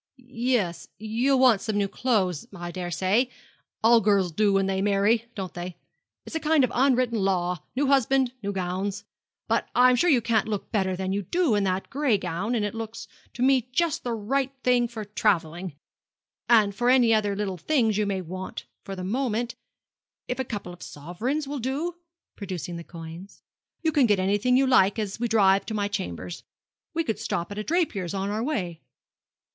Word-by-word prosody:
'Yes, 240 Hz, -7 st, -1 dB
you'll 230 Hz, +6 st, +1 dB
want 250 Hz, -6 st, +5 dB
some 215 Hz, -2 st, -2 dB
new 200 Hz, -1 st, +1 dB
clothes, 195 Hz, -, 0 dB
I 175 Hz, -1 st, -6 dB
daresay. 185 Hz, +7 st, 0 dB, 0.5 s
All 230 Hz, +1 st, +6 dB
girls 200 Hz, -4 st, +2 dB
do 205 Hz, +5 st, +2 dB
when 195 Hz, 0 st, +2 dB
they 190 Hz, 0 st, 0 dB
marry, 205 Hz, +3 st, +2 dB
don't 190 Hz, -3 st, -5 dB
they? 175 Hz, 0 st, -6 dB, 0.5 s
It's -, -, -9 dB
a -, -, +1 dB
kind 310 Hz, -2 st, +3 dB
of 255 Hz, -, +1 dB
unwritten 250 Hz, -3 st, +2 dB
law 180 Hz, -3 st, 0 dB, 0.2 s
new 280 Hz, +3 st, +1 dB
husband, 270 Hz, -1 st, +3 dB
new 200 Hz, -1 st, -2 dB
gowns. 190 Hz, +2 st, -3 dB, 0.4 s
But -, -, 0 dB
I'm 250 Hz, 0 st, +6 dB
sure 350 Hz, +8 st, +3 dB
you 270 Hz, -6 st, +5 dB
can't 230 Hz, -2 st, +1 dB
look 210 Hz, -2 st, -4 dB
better 190 Hz, -4 st, 0 dB
than 190 Hz, +1 st, -2 dB
you 200 Hz, -, 0 dB
do 330 Hz, -, +1 dB
in 205 Hz, -1 st, +2 dB
that 185 Hz, 0 st, -2 dB
gray 275 Hz, -6 st, +2 dB
gown, 195 Hz, +6 st, -2 dB
and 215 Hz, -3 st, 0 dB
it 205 Hz, -, -3 dB
looks 225 Hz, -1 st, -6 dB, 0.3 s
to 245 Hz, -, -2 dB
me 260 Hz, -2 st, +3 dB
just 335 Hz, +4 st, 0 dB
the 240 Hz, -2 st, -2 dB
right 265 Hz, +5 st, -1 dB
thing 245 Hz, -1 st, +3 dB
for 225 Hz, -2 st, -7 dB
travelling. 180 Hz, -5 st, -1 dB, 0.7 s
And 215 Hz, -4 st, +5 dB
for 240 Hz, +4 st, +1 dB
any 245 Hz, -3 st, +5 dB
other 205 Hz, -2 st, +1 dB
little 195 Hz, -2 st, -2 dB
things 230 Hz, -, +2 dB
you 210 Hz, 0 st, +1 dB
may 195 Hz, -2 st, -1 dB
want 185 Hz, +2 st, -7 dB, 0.2 s
for 195 Hz, -, -6 dB
the 185 Hz, -, -6 dB
moment, 240 Hz, +3 st, -1 dB, 0.7 s
if 250 Hz, -, -3 dB
a -, -, +1 dB
couple 205 Hz, -7 st, -6 dB
of 175 Hz, -, -15 dB
sovereigns 220 Hz, -, -4 dB
will 285 Hz, 0 st, -4 dB
do' 275 Hz, +8 st, -2 dB, 0.4 s
producing 180 Hz, -3 st, -5 dB
those 170 Hz, -, -9 dB
coins 170 Hz, +3 st, -10 dB, 0.4 s
'you 320 Hz, -, +2 dB
can 280 Hz, -5 st, +4 dB
get 205 Hz, -2 st, +3 dB
anything 205 Hz, +7 st, +2 dB
you 270 Hz, -, +4 dB
like 205 Hz, -6 st, +4 dB
as 210 Hz, -1 st, -3 dB
we 240 Hz, -, 0 dB
drive 200 Hz, -3 st, +4 dB
to 220 Hz, -, -3 dB
my 205 Hz, -1 st, 0 dB
chambers. 90 Hz, -, -5 dB, 0.5 s
We 330 Hz, -, +1 dB
could 225 Hz, -7 st, -2 dB
stop 170 Hz, +3 st, -3 dB
at 205 Hz, -, -5 dB
a -, -, -2 dB
draper's 210 Hz, -, -1 dB
on 195 Hz, +1 st, -2 dB
our 215 Hz, +1 st, -1 dB
way.' 185 Hz, -, -3 dB
210 Hz, 190 wpm, -26 LUFS, 190-250 Hz, 0.7 s, All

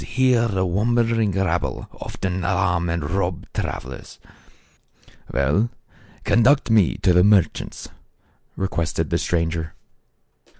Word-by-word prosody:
83 -, -, -11 dB
here 120 Hz, -2 st, +4 dB
the 95 Hz, -3 st, 0 dB
wandering 115 Hz, +3 st, +1 dB
rabble 90 Hz, -3 st, -1 dB
often 95 Hz, -1 st, -4 dB
alarm 90 Hz, -2 st, 0 dB
and 85 Hz, -3 st, -2 dB
rob 95 Hz, -3 st, -2 dB
travelers.'' 65 Hz, +2 st, -5 dB, 1.1 s
"Well, 75 Hz, -, +1 dB, 0.5 s
conduct 120 Hz, +1 st, +3 dB
me 105 Hz, -6 st, +4 dB
to 90 Hz, -2 st, +4 dB
the 90 Hz, +1 st, +5 dB
merchants," 100 Hz, -5 st, +1 dB, 0.7 s
re 95 Hz, -, -1 dB
quested 85 Hz, -3 st, -2 dB
the -, -, +1 dB
stranger. 80 Hz, -2 st, -2 dB
95 Hz, 115 wpm, -22 LUFS, 85-110 Hz, 1.1 s, the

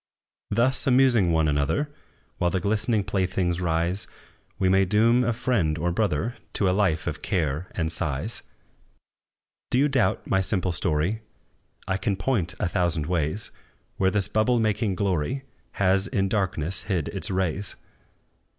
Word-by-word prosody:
Thus, 120 Hz, +7 st, +2 dB
amusing 125 Hz, -8 st, +4 dB
one 80 Hz, -1 st, +2 dB
another, 75 Hz, -, 0 dB, 0.5 s
While 90 Hz, -, +2 dB
the 95 Hz, -, 0 dB
glistening 105 Hz, +2 st, +1 dB
playthings 95 Hz, -2 st, -1 dB
rise, 85 Hz, +3 st, -1 dB, 0.5 s
We 95 Hz, -, +1 dB
may 95 Hz, +1 st, +4 dB
doom 115 Hz, +6 st, +3 dB
a 120 Hz, -, +1 dB
friend 105 Hz, -10 st, 0 dB
or 85 Hz, +2 st, 0 dB
brother 105 Hz, +3 st, -1 dB, 0.2 s
To 100 Hz, -, +2 dB
a -, -, +3 dB
life 95 Hz, -5 st, +1 dB
of -, -, -4 dB
care 80 Hz, -2 st, -1 dB
and 80 Hz, -2 st, -1 dB
sighs. 80 Hz, -, -2 dB, 1.3 s
Do -, -, +1 dB
you 140 Hz, +3 st, +4 dB
doubt 135 Hz, -4 st, +1 dB
my 95 Hz, -, +1 dB
simple 95 Hz, -1 st, +1 dB
story? 85 Hz, +5 st, +1 dB, 0.7 s
I 95 Hz, 0 st, 0 dB
can 100 Hz, -1 st, -1 dB
point 95 Hz, -, -1 dB
a -, -, +1 dB
thousand 85 Hz, -3 st, 0 dB
ways 85 Hz, +4 st, -2 dB, 0.5 s
Where 95 Hz, -, +3 dB
this 100 Hz, -1 st, 0 dB
bubble 110 Hz, +3 st, +2 dB
making 110 Hz, -2 st, 0 dB
glory 95 Hz, -, -1 dB, 0.3 s
Has 95 Hz, +1 st, +2 dB
in 100 Hz, -6 st, 0 dB
darkness 95 Hz, -4 st, -1 dB
hid 90 Hz, -7 st, 0 dB
its -, -, -3 dB
rays! 95 Hz, +1 st, -2 dB
95 Hz, 150 wpm, -25 LUFS, 85-110 Hz, 1.3 s, amusing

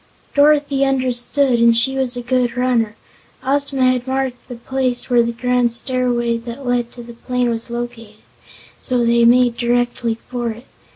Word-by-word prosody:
Dorothy 285 Hz, -1 st, +3 dB
understood 255 Hz, -1 st, +1 dB
and 230 Hz, 0 st, +5 dB
she 265 Hz, +3 st, +4 dB
was 255 Hz, -2 st, -1 dB
a 245 Hz, -, -5 dB
good 245 Hz, -1 st, 0 dB
runner. 240 Hz, -4 st, 0 dB, 0.5 s
Ozma 270 Hz, -1 st, +2 dB
had 250 Hz, 0 st, -3 dB
marked 260 Hz, -1 st, -3 dB
the 250 Hz, -, -7 dB
place 255 Hz, +1 st, -3 dB
where 240 Hz, -1 st, +5 dB
the 235 Hz, 0 st, -1 dB
grand 250 Hz, 0 st, 0 dB
stairway 240 Hz, -1 st, -1 dB
that 235 Hz, +3 st, -8 dB
led 245 Hz, -1 st, -1 dB
to 240 Hz, -, -10 dB
the 235 Hz, 0 st, -11 dB
plain 250 Hz, +1 st, -2 dB
was 230 Hz, +1 st, -4 dB
located, 235 Hz, -2 st, -6 dB, 0.6 s
so 245 Hz, -2 st, 0 dB
they 235 Hz, 0 st, +3 dB
made 245 Hz, 0 st, +4 dB
directly 240 Hz, -1 st, 0 dB
for 240 Hz, -2 st, -3 dB
it. 230 Hz, +3 st, -8 dB
245 Hz, 165 wpm, -18 LUFS, 235-255 Hz, 0.6 s, and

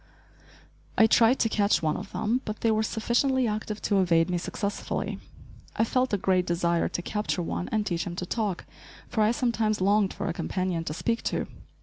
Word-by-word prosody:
I 220 Hz, -, +7 dB
tried 230 Hz, +3 st, +5 dB
to -, -, +3 dB
catch 205 Hz, -4 st, +2 dB
one 155 Hz, -1 st, +1 dB
of 200 Hz, +1 st, -7 dB
them, 235 Hz, +4 st, 0 dB
but 215 Hz, 0 st, -6 dB
they 225 Hz, -, +3 dB
were 215 Hz, 0 st, +2 dB
sufficiently 240 Hz, +4 st, +1 dB
active 215 Hz, 0 st, -4 dB
to 200 Hz, -2 st, +2 dB
evade 170 Hz, -1 st, +3 dB
me 175 Hz, -, 0 dB
successfully. 200 Hz, +3 st, -3 dB, 0.6 s
I -, -, +2 dB
felt 255 Hz, +3 st, +1 dB
a 205 Hz, -, +2 dB
great 185 Hz, -1 st, +1 dB
desire 170 Hz, 0 st, +1 dB
to 175 Hz, -, -4 dB
capture 210 Hz, -3 st, -2 dB
one 180 Hz, -, -3 dB
and 215 Hz, -1 st, 0 dB
teach 170 Hz, -4 st, -1 dB
him 175 Hz, -, -5 dB
to 180 Hz, -, -4 dB
talk, 205 Hz, -2 st, -2 dB, 0.4 s
for 220 Hz, -, -1 dB
I 210 Hz, -, +4 dB
sometimes 225 Hz, -3 st, 0 dB
longed 200 Hz, +1 st, +3 dB
for -, -, -5 dB
a 170 Hz, -, -1 dB
companion 180 Hz, -2 st, -2 dB
to 150 Hz, -, -4 dB
speak 230 Hz, +6 st, -1 dB
to. -, -, -1 dB
210 Hz, 200 wpm, -27 LUFS, 180-220 Hz, 0.6 s, I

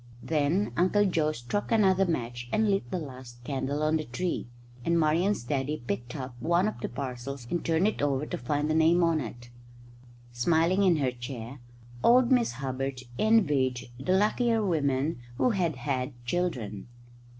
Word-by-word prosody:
Then 160 Hz, +6 st, +1 dB
Uncle 195 Hz, +4 st, +3 dB
Joe 160 Hz, -5 st, +1 dB
struck 155 Hz, -, -3 dB
another 195 Hz, -4 st, +4 dB
match 120 Hz, -6 st, -3 dB
and 215 Hz, -1 st, +2 dB
lit 195 Hz, -11 st, -1 dB
the -, -, -2 dB
last 130 Hz, -6 st, -9 dB
candle 140 Hz, +2 st, -2 dB
on 155 Hz, +1 st, +3 dB
the 155 Hz, -, -3 dB
tree, 170 Hz, +4 st, -3 dB, 0.4 s
and 170 Hz, +3 st, +2 dB
Marian's 165 Hz, -, +2 dB
daddy 135 Hz, +2 st, -2 dB
picked 120 Hz, +4 st, -4 dB
up 130 Hz, -3 st, -5 dB
one 170 Hz, +6 st, +2 dB
of 215 Hz, -, -4 dB
the -, -, -3 dB
parcels 130 Hz, 0 st, -5 dB
and 175 Hz, -, -1 dB
turned 165 Hz, +4 st, +2 dB
it 215 Hz, -, -2 dB
over 140 Hz, 0 st, +1 dB
to -, -, -4 dB
find 145 Hz, +4 st, -1 dB
the 155 Hz, -, +1 dB
name 165 Hz, +2 st, +4 dB
on 165 Hz, -2 st, +3 dB
it. 120 Hz, 0 st, -8 dB, 0.8 s
Smiling 165 Hz, +9 st, +2 dB
in 185 Hz, -4 st, +5 dB
her 135 Hz, -4 st, +1 dB
chair, 125 Hz, +1 st, -7 dB, 0.4 s
old 245 Hz, +1 st, +5 dB
Miss 245 Hz, -, +3 dB
Hubbard 135 Hz, +1 st, -3 dB, 0.2 s
envied 145 Hz, -, +2 dB
the 160 Hz, +8 st, 0 dB
luckier 225 Hz, +2 st, +2 dB
women 145 Hz, -4 st, 0 dB, 0.2 s
who 250 Hz, -, +3 dB
had 175 Hz, -7 st, 0 dB
had 130 Hz, +2 st, -2 dB
children. 125 Hz, -, -2 dB
150 Hz, 165 wpm, -28 LUFS, 130-180 Hz, 0.8 s, in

